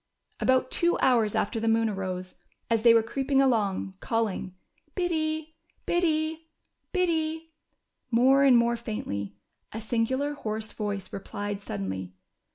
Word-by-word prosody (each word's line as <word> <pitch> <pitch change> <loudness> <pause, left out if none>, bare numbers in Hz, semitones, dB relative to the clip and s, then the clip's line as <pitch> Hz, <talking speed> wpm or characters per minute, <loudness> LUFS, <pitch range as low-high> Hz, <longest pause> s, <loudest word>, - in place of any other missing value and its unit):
About 260 0 +2
two 345 0 +2
hours 230 -5 +3
after 225 +2 0
the 225 - -2
moon 225 0 +3
arose, 185 -3 -4 0.4
as 225 -1 +3
they 235 0 +7
were 230 -1 +5
creeping 270 +4 0
along, 210 -8 +1
calling 215 -5 -2 0.4
"Biddy, 315 -3 -1 0.3
Biddy, 320 -2 0 0.4
Biddy," 325 -3 0 0.6
more 260 +4 +5
and 265 -3 +7
more 235 0 +3
faintly, 100 - -5 0.4
a 220 - -5
singular, 245 +6 0
hoarse 220 -5 -4
voice 205 -3 -4
replied 205 +1 -5
suddenly. 95 - -5
230 Hz, 125 wpm, -27 LUFS, 205-295 Hz, 0.6 s, they